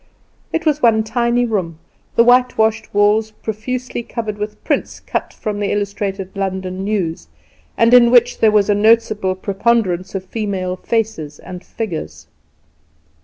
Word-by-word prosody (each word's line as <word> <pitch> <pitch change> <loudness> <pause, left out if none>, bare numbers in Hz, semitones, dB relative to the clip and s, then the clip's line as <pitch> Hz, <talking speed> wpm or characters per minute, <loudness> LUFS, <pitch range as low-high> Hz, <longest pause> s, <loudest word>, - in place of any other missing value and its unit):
It 325 +1 -2
was 300 -1 +1
one 220 -2 +4
tiny 235 +2 +1
room, 185 -8 -2 0.4
the 235 - +6
whitewashed 235 -3 +2
walls 210 +2 +3
profusely 240 +4 -5
covered 220 -3 -5
with 210 0 -6
prints - - -2
cut - - -4
from 210 -1 -4
the 205 - -1
"Illustrated 200 -2 -3
London 190 -1 -3
News", 185 - -2 0.5
and 230 +1 +4
in 240 -1 +8
which 245 -1 +4
there 220 - +5
was 210 -2 +3
a 205 - +3
noticeable 215 -2 +2
preponderance 195 -2 0
of 190 -1 -4
female 190 -3 -3
faces 200 -8 -2
and 180 -1 -10
figures. 80 - -6
210 Hz, 140 wpm, -18 LUFS, 190-230 Hz, 0.5 s, in